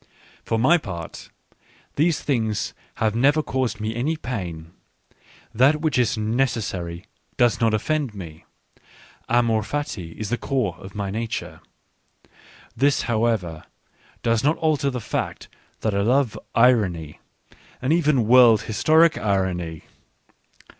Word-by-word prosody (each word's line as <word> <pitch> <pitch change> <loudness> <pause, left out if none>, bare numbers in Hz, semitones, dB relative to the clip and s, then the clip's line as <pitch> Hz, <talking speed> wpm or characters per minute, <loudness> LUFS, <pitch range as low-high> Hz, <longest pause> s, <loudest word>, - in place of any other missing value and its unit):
For 115 - -1
my 135 +10 +4
part, 85 - -8 0.7
these 155 0 +2
things 110 -7 -1 0.2
have 110 -1 0
never 145 +6 +3
caused 125 -6 -2
me 110 +1 -3
any 145 +7 -1
pain; 85 - -6 0.8
that 135 +7 +4
which 155 -5 +1
is 120 -2 +1
necessary 105 -6 -2 0.3
does 120 -2 +2
not 115 -1 +3
offend 140 0 -1
me. 80 -5 -9 0.9
Amor 115 -2 +2
fati 105 - -5
is 110 0 -5
the 120 - 0
core 125 -10 -1
of 95 +1 -11
my 100 -2 -3
nature. 115 +2 -4 1.1
This, 140 +1 +2
however, 110 -9 -1 0.6
does 115 -1 +1
not 150 +3 +2
alter 155 -3 +1
the 125 -2 -3
fact - - -4 0.3
that 110 - 0
I 100 - +1
love 125 +3 +2 0.2
irony 100 -11 +2 0.6
and 130 +4 +1
even 150 -9 +2
world 120 -3 +6
historic 155 +9 +3
irony. 90 -5 -1
115 Hz, 125 wpm, -23 LUFS, 100-135 Hz, 1.1 s, world